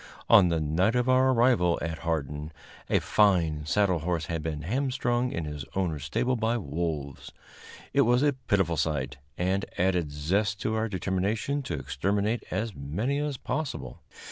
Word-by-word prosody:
On 100 -5 +8
the 85 -1 +1
night 80 +9 +1
of 125 0 +1
our 130 +1 +4
arrival 115 -9 +3
at 80 -1 -4
Hardin, 75 -2 -3 0.4
a - - +4
fine 85 -8 +2
saddle 95 -1 +2
horse 85 0 -1
had 85 -1 -3
been 75 -1 -4
hamstrung 125 - 0
in 85 - -3
his 75 -2 -5
owner's 80 -7 -1
stable 120 - 0
by 115 0 0
wolves. 75 - -4 0.6
It - - +5
was 120 +3 +3
a 145 -1 +3
pitiful 100 - 0
sight, 75 -3 -1 0.2
and 95 +2 0
added 90 -4 +1
zest 100 +8 0
to 110 - -1
our 110 0 0
determination 100 - -1
to 135 - -4
exterminate 100 - -1
as 110 +4 -2
many 100 - -2
as 145 -2 -2
possible. 155 +3 -4
95 Hz, 160 wpm, -28 LUFS, 80-115 Hz, 0.6 s, On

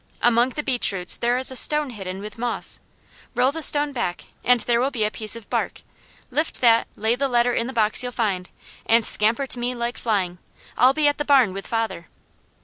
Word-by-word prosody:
Among 240 +1 +3
the 300 +4 -5
beech 255 -6 +1
roots 180 -2 +1
there 240 +1 0
is 260 +1 +2
a - - -8
stone 300 +1 +3
hidden 190 -3 -7
with 210 +1 -10
moss. 240 0 0 0.6
Roll 250 +3 +2
the 325 +2 -6
stone 295 -1 +2
back 235 -10 -4 0.2
and 250 0 +3
there 235 +2 +1
will 265 - +1
be 240 -6 -2
a 210 - 0
piece 215 0 0
of 230 -2 -11
bark. - - -3 0.5
Lift 305 +5 -2
that, 230 -2 +3
lay 220 +2 0
the 275 +2 -1
letter 245 -1 +1
in 230 - -1
the - - -5
box 220 -3 +2
you'll 250 0 -4
find, 195 -7 -2 0.4
and 230 0 +3
scamper 225 +6 +4
to 255 - -5
me 245 +1 -3
like 235 0 -4
flying. 185 -6 -2 0.4
I'll 255 +2 +4
be 305 -1 +2
at 290 +1 0
the - - 0
barn 265 -9 +3
with 195 +1 -7
father." 220 -7 -3
240 Hz, 220 wpm, -22 LUFS, 215-260 Hz, 0.6 s, scamper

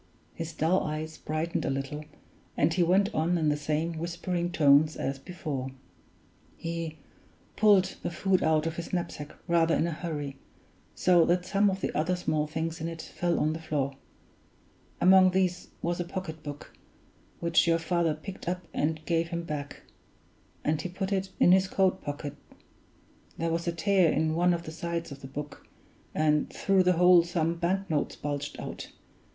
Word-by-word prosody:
His 165 0 -5
dull 165 +4 +2
eyes 155 +1 -4
brightened 155 +2 -2
a - - -1
little, 140 +3 -3 0.5
and 155 +3 +3
he 180 - +1
went 190 +4 +3
on 170 +3 +1
in 155 -2 +2
the 150 - +2
same 155 +2 -2
whispering 175 +1 -2
tones 150 -1 +5
as 135 0 -3
before: 145 -5 -5 0.9
"He 165 -1 -4 0.6
pulled 205 -4 +4
the - - -2
food 185 +2 +1
out 155 -1 +2
of 165 0 -3
his 170 - -5
knapsack 170 -4 -4
rather 165 -1 +3
in - - +2
a 170 - -1
hurry, 150 -4 -4 0.6
so 175 -2 +5
that 175 +1 +1
some 200 +2 +3
of 190 0 -3
the - - -2
other 160 +4 +1
small 155 -4 -1
things 160 +1 -3
in 165 - -2
it 165 -1 -6
fell 175 -1 -1
on 155 +1 +1
the 160 - -5
floor. 145 -4 -2 1.0
Among 185 0 +7
these 185 -1 0 0.2
was 170 +1 -1
a - - +1
pocketbook, 160 -5 -7 0.7
which 170 0 +3
your 165 0 +4
father 165 -1 0
picked 180 +3 -7
up 180 0 -3
and 155 +1 -1
gave 165 -1 +1
him 170 0 -3
back; 150 -3 -6 0.8
and 155 0 +1
he 180 - -4
put 190 +2 -4
it 190 0 -1
in 175 - +6
his 190 +1 +5
coat 190 0 +1
pocket 145 0 -5 1.0
there 165 0 -1
was 170 +1 -2
a - - +2
tear 170 0 +3
in 155 0 +1
one 175 +2 +3
of 170 - -6
the 155 - -7
sides 170 0 -4
of 140 0 -9
the 135 - -8
book, 145 +2 -8 0.5
and 150 -1 +2
through 195 -1 +2
the 180 0 +4
hole 180 0 +7
some 170 -1 0
bank 185 +3 -1
notes 155 -4 -1
bulged 145 0 -4
out. - - -6
165 Hz, 175 wpm, -28 LUFS, 155-180 Hz, 1.0 s, Among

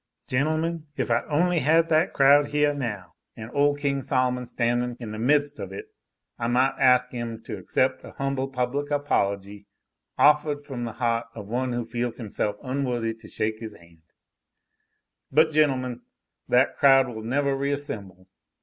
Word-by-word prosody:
Gentlemen, 155 +4 -1
if - - -1
I 115 - +3
only 170 +3 +2
had 160 +4 +3
that 160 +3 +3
crowd 145 +1 +5
heah 150 0 +2
now, 110 -10 -5 0.2
an' 110 +1 -8
ole 145 0 +2
King 140 -1 -1
Sol'mon 125 -2 0
standin' 120 0 -1
in 115 -3 -6
the 110 - -6
midst 145 +4 +1
of - - -6
it, 430 0 -8 0.5
that 115 - -2
I - - +1
might 130 +3 +2
ask 125 -1 +4
'im 115 -2 -5
to 105 -4 -6
accept 130 +8 0
a - - -10
humble 135 -1 -2
public 135 +2 -2
apology, 100 -8 -1 0.5
offahed 150 0 +3
from 125 -4 -5
the 115 - -5
heaht 115 0 0
of 105 -2 -9
one 125 +1 -1
who 120 -1 -2
feels 120 0 -3
himself 105 -2 -3
unworthy 125 -4 -1
to 110 - -15
shake 110 +1 -3
'is 110 -2 -7
han'! 85 -1 -20 1.3
But 155 +3 +4
gentlemen, 130 -5 +1 0.5
that 125 +2 +3
crowd 135 -1 +6
will 110 -3 -7
nevah 140 +5 0
reassemble. 115 -10 -4
130 Hz, 165 wpm, -25 LUFS, 115-145 Hz, 1.3 s, crowd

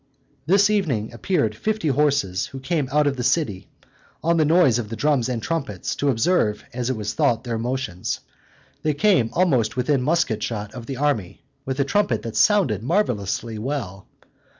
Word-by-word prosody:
This 200 +4 +4
evening 135 - 0
appeared 115 - 0
fifty 210 - -1
horses, 140 -10 +1
who 135 - -8
came 145 -1 -1
out 150 +1 +3
of 140 -2 0
the 125 - -2
city, 125 - 0 0.6
on 170 +1 +2
the 155 - +3
noise 155 -7 +4
of 110 -3 -5
the 115 - -4
drums 140 -2 +1
and 115 -3 -3
trumpets, 140 -4 -3
to 145 - +1
observe, 115 -3 +1
as 125 0 -2
it 130 - 0
was 105 -1 -3
thought, 130 -7 +1
their 115 -3 -3
motions: 125 -6 -3 0.6
they 155 -2 0
came 175 - +3
almost 125 -12 +2
within 130 +1 +1
musket 125 -7 +1
shot 105 -2 -4
of 115 -1 -9
the 135 - -4
army, 135 -10 -1 0.2
with 130 +1 -3
a 140 - +3
trumpet 140 - +1
that 115 -1 -6
sounded 160 - +3
marvelously 115 - -1
well. 110 -7 -4
130 Hz, 175 wpm, -23 LUFS, 115-155 Hz, 0.6 s, This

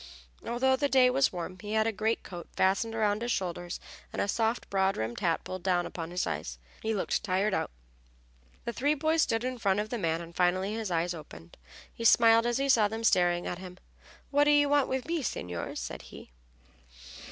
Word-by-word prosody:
Although 260 +2 +1
the 285 +1 0
day 255 -2 +5
was 270 +1 +3
warm 180 +1 -6
he 210 +3 -6
had 220 0 +3
a 225 - +1
greatcoat 215 -4 -3
fastened 200 +4 +1
about 210 -1 +1
his 240 +1 -1
shoulders 175 -3 -3 0.3
and - - -5
a - - +1
soft, 225 +3 0
broad 195 0 +2
brimmed 110 +2 -3
hat 165 -2 0
pulled 185 -1 -6
down 180 -1 +1
upon 165 -1 -6
his 180 +1 -1
head. - - -3 0.3
He 220 0 -1
looked 195 - -1
tired 190 +3 +1
out. - - 0 1.0
The 235 - -3
three 290 +5 +1
boys 315 +2 +2
stood 225 -3 +1
in 255 -1 -3
front 200 -2 +2
of 210 +1 -2
the 240 - -2
man, 165 -3 0
and 170 0 -10
finally 185 +3 +1
his 220 -2 -3
eyes 175 0 0
opened. 85 - -11 0.4
He 230 - -7
smiled 230 0 +6
as 240 0 +1
he 275 +1 0
saw 225 -6 +5
them 225 +2 -5
staring 175 -5 +3
at 175 - -4
him. 185 -1 -9 0.5
"What 290 +1 +4
do - - +4
you 290 -1 +5
want 290 -2 +3
with 260 -1 -2
me, 335 -1 -1
signors?" 90 - -4
said - - -6
he. - - -13
210 Hz, 210 wpm, -29 LUFS, 180-240 Hz, 1.0 s, smiled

